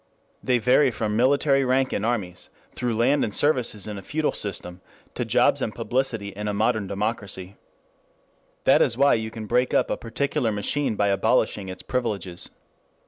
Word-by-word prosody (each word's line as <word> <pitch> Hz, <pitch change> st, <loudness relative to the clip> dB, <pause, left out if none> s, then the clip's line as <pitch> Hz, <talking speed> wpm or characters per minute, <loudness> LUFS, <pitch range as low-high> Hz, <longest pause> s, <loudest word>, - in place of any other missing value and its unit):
They 125 Hz, -1 st, +2 dB
vary 125 Hz, +4 st, +4 dB
from 110 Hz, -2 st, -2 dB
military 135 Hz, +3 st, +3 dB
rank 130 Hz, +1 st, +1 dB
in 100 Hz, -, -1 dB
armies, 105 Hz, -7 st, -2 dB, 0.2 s
through 120 Hz, -3 st, -2 dB
land 135 Hz, +5 st, +3 dB
and 105 Hz, -, -1 dB
services 120 Hz, -7 st, +1 dB
in 105 Hz, -2 st, -6 dB
a -, -, -9 dB
feudal 155 Hz, +9 st, -1 dB
system, 90 Hz, -3 st, -3 dB, 0.3 s
to -, -, -2 dB
jobs -, -, +2 dB
and -, -, -3 dB
publicity 120 Hz, -5 st, -2 dB
in 105 Hz, +2 st, -6 dB
a 105 Hz, -, -1 dB
modern 110 Hz, -1 st, +1 dB
democracy. 100 Hz, -2 st, -4 dB, 1.1 s
That -, -, +5 dB
is 115 Hz, -, +2 dB
why 140 Hz, +1 st, +5 dB
you 110 Hz, -1 st, -1 dB
can 110 Hz, 0 st, -7 dB
breakup 125 Hz, +4 st, +1 dB
a -, -, -1 dB
particular 115 Hz, 0 st, -1 dB
machine 110 Hz, +5 st, -1 dB
by 100 Hz, 0 st, +1 dB
abolishing 100 Hz, -1 st, +1 dB
its 95 Hz, -, -6 dB
privileges. 100 Hz, -8 st, -3 dB
110 Hz, 165 wpm, -24 LUFS, 100-125 Hz, 1.1 s, That